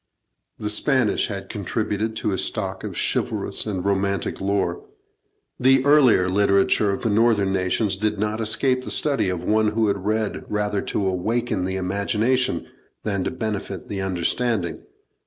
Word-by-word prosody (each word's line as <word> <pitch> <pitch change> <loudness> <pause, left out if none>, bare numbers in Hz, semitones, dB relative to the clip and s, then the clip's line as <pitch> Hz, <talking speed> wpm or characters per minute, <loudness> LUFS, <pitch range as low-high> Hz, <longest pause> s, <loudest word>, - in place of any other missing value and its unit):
The 105 0 -2
Spanish 130 0 +2
had 100 -2 -6
contributed 110 +1 -2
to 110 - -1
his 95 - 0
stock - - -3
of - - -5
chivalrous - - 0
and 95 -3 -3
romantic 100 0 -1
lore. 100 - -1 0.8
The 135 +1 +4
earlier 135 -10 +5
literature 100 +1 +3
of 100 - -2
the 115 - +1
northern 105 -3 +3
nations 95 +2 +1
did 105 +1 -1
not 105 +2 -1
escape 130 +4 +1
the - - -6
study 140 -10 +1
of 90 -2 -3
one 110 0 +2
who 110 -2 +2
read 105 +2 -2
rather 105 -1 -1
to 100 - -2
awaken 100 +2 -1
the 95 0 -2
imagination 105 +7 0 0.4
than 100 -3 -1
to - - 0
benefit 105 -5 -4
the 100 -1 -3
understanding. 95 0 -1
105 Hz, 150 wpm, -23 LUFS, 95-110 Hz, 0.8 s, earlier